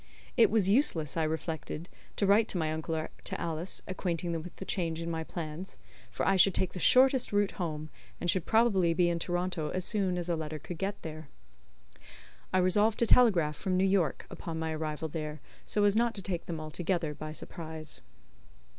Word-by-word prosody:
It - - +6
was 210 -3 +2
useless, 195 - +2
I 165 - +1
reflected, 160 +1 -3 0.3
to 200 - +1
write 210 +3 +5
to - - -2
my 155 -2 0
uncle 160 +1 -3
or 155 0 -3
to - - -1
Alice, 165 +2 -2
acquainting 175 -2 -2
them 165 -1 -2
with 180 +2 -10
the 190 - -7
change 165 -4 -1
in 165 0 -3
my 160 -1 -2
plans, 165 +2 -6 0.3
for - - -2
I 195 - +4
should 190 0 +6
take 190 - 0
the 180 - -5
shortest 260 - +5
route 205 -1 +2
home, 155 -4 -4 0.3
and - - -3
should 175 -1 +1
probably 200 -7 +3
be 175 0 +3
in 170 -1 -1
Toronto 175 -2 -2
as 185 -1 -2
soon 195 -4 +1
as 175 -1 -3
a 170 - +1
letter 155 -1 -4
could 160 +2 -8
get 200 +1 -2
there. 155 -2 -7 1.2
I 185 - +2
resolved 205 +4 +3
to 235 - +3
telegraph 185 -12 +5
from 185 -1 -1
New 190 - +3
York, 190 -4 +1
upon 165 -1 -6
my 160 0 -2
arrival 155 0 -3
there, 155 -1 -5 0.3
so 210 - +1
as 205 0 +4
not 235 +1 +2
to 195 - -4
take 175 -3 -4
them 165 -2 -4
altogether 160 +1 -2
by 155 +1 -7
surprise. 160 -1 -6
175 Hz, 200 wpm, -30 LUFS, 160-195 Hz, 1.2 s, It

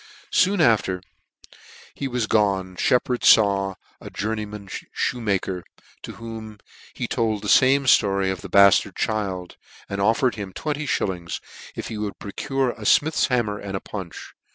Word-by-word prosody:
Soon 195 0 +3
after 100 - +2 0.9
he 140 - -4
was 125 -3 -1
gone 95 -4 +1
Sheppard 125 +4 +1
faw 100 -2 +4 0.2
a - - -9
jour 110 +3 -3
neyman 105 -2 -7
fhoemaker, 100 -4 -2 0.4
to - - -8
whom 110 -2 -8 0.4
he - - -3
told 110 -3 -1
the - - -4
fame 135 +1 +5
ftory 100 -5 +3
of 95 - -5
the - - -8
baftard 100 -1 +5
child, 95 -5 -3 0.3
and 100 0 -3
offered 115 +4 +2
him 100 -3 -7
twenty 150 - -3
fhillings 90 -7 -2 0.4
if - - -5
he 110 - -5
would 105 -1 -4
procure 135 +5 -2
a 115 - -13
fmith's 150 +9 +3
hammer 115 -5 0
and 95 -1 -4
a - - -4
punch. 95 -5 -8
105 Hz, 155 wpm, -23 LUFS, 95-120 Hz, 0.9 s, fame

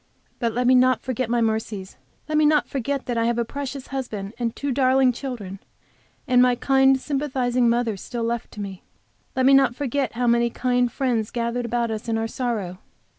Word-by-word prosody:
But 230 -2 0
let 250 +1 0
me 255 - +5
not 255 -1 +4
forget 255 -2 -2
my 240 0 +1
mercies. 220 -3 -2 0.3
Let 310 - -2
me 305 - +4
not 300 0 +3
forget 275 +1 -3
that 240 -2 -1
I 230 - +1
have 235 0 +1
a 235 - 0
precious 275 +1 -6
husband 220 -7 -5
and 230 -2 -2
two 285 -1 -3
darling 260 0 +3
children, 235 -7 -6 0.7
and 250 -2 +5
my 250 -1 +4
kind, 270 +1 +3
sympathizing 255 -4 0
mother 235 -2 +1 0.2
left 235 0 -2
to 210 - -7
me. 195 -2 -7 0.5
Let 260 - +2
me 275 - +6
not 270 -3 +4
forget 275 -2 -2
how 245 +2 -1
many 235 0 +3
kind 245 0 0
friends 240 -5 -1
gathered 240 0 -2
about 235 0 -1
us 220 +1 -5
in 225 - +1
our 225 0 -1
sorrow. 220 -8 -3
245 Hz, 195 wpm, -23 LUFS, 230-265 Hz, 0.7 s, me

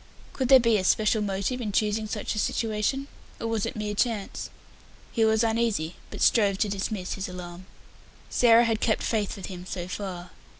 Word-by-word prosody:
Could 260 - -1
there 265 -1 +9
be 230 -2 +3
a - - -2
special 215 +3 +3
motive 200 +5 -2
in 215 -3 -2
choosing 215 +1 0
such 210 0 -3
a 210 - -2
situation, 225 +6 -1 0.3
or - - -4
was 225 -2 -1
it - - -5
mere 210 -1 -3
chance? 210 -1 -2 0.6
He 225 - +1
was 220 +1 +3
uneasy, 220 -8 0
but - - -8
strove 200 -4 +4
to 210 - +1
dismiss 195 -1 -3
his 195 -1 -4
alarm. 180 0 -9 0.6
Sarah 235 -1 +5
had 225 -1 0
kept 220 - +1
faith 215 -3 -1
with 195 - -7
him 180 -2 -7
so 175 -1 -4
far. 180 -2 -6
210 Hz, 185 wpm, -26 LUFS, 195-225 Hz, 0.6 s, there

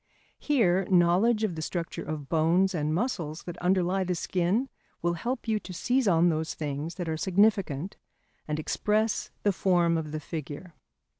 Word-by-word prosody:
Here 195 -10 +2
knowledge 190 +6 +4
of 210 -5 0
the 160 - -5
structure 165 +1 -4
of 150 -2 -5
bones 170 +6 +2
and 150 -3 -1
muscles 170 - -2
that 175 - -7
underlie 185 +1 +1
the 180 -1 -1
skin 185 +9 0 0.4
will 170 0 +2
help 240 +8 -4
you 220 -1 +1
to 185 - -9
seize 250 +7 +1
on 175 -1 +4
those 160 -1 -2
things 150 +2 -4
that 175 -2 -4
are 160 0 -1
significant 190 -3 +1 0.5
and 150 0 -2
express 210 +7 0
the 205 - +3
form 175 -3 +2
of 155 -2 -6
the 155 - -3
figure. 155 +2 -7
175 Hz, 165 wpm, -28 LUFS, 160-200 Hz, 0.5 s, knowledge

